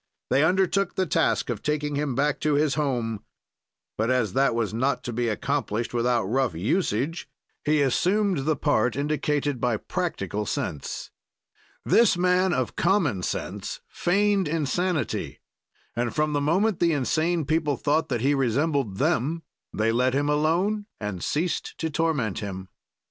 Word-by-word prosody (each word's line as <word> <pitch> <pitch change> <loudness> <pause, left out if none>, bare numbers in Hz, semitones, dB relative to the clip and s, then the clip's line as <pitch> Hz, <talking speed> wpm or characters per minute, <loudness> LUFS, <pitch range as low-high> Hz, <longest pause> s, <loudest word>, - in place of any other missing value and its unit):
"They 135 +3 +4
undertook 190 +2 +2
the 190 - +1
task 140 - +1
of 110 - -4
taking 150 0 -1
him 140 -3 -1
back 145 +2 +1
to 150 -1 +1
his 145 -1 +2
home, 120 -7 -1 0.8
but, 110 +2 +1
as 125 -6 +1
that 135 -3 +2
was 115 -3 -1
not 125 +2 0
to 120 - -4
be 120 +1 0
accomplished 120 -1 -2
without 120 0 +1
rough 120 -1 0
usage, 130 - -1 0.3
he 150 0 +3
assumed 185 - +2
the 155 0 +2
part 125 -6 +1
indicated 145 -2 -1
by 120 -3 +1
practical 105 - -3
sense; 75 -5 -4 0.7
this 230 -6 +4
man 180 +1 +3
of 130 -8 -1
common 170 - +2
sense - - -4
feigned 200 0 +1
insanity, 165 +2 -1 0.6
and 120 0 -1
from 150 0 +1
the 145 - +1
moment 185 +7 +1
the 170 -1 +3
insane 155 +4 0
people 150 -2 0
thought 150 +5 +1
that 120 -4 -1
he 140 +3 +3
resembled 135 -4 0
them 155 - 0 0.3
they 110 +1 +1
let 125 +2 +2
him 145 +1 +1
alone 175 +8 +1
and 105 -4 -4
ceased 165 +3 -2
to 160 -1 -2
torment 150 - 0
him. 95 -3 -6
145 Hz, 150 wpm, -25 LUFS, 120-165 Hz, 0.8 s, They